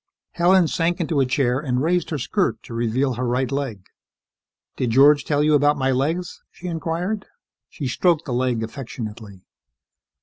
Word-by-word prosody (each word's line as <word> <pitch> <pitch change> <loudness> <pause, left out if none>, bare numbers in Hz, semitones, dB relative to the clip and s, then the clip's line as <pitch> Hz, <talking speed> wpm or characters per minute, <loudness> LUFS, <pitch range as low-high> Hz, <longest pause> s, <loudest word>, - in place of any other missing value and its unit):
Helen 175 0 +4
sank 170 +2 0
into 160 -3 0
a 135 - +2
chair 125 -1 +1
and 130 -3 -1
raised 175 +1 +1
her 155 - -2
skirt 130 - -1
to - - -10
reveal 120 +3 0
her 125 +1 -2
right 125 +2 0
leg. 135 -9 -3 0.9
"Did 125 - -1
George 140 +4 +5
tell 145 -1 +1
you 155 0 +3
about 145 0 +4
my 135 -1 +1
legs?" 160 +7 -2
she 180 - -14
inquired. 175 +4 -3 0.4
She 145 - -6
stroked 165 +5 +1
the 130 - -3
leg 125 -2 0
affectionately. 110 -5 -8
140 Hz, 165 wpm, -22 LUFS, 125-165 Hz, 0.9 s, George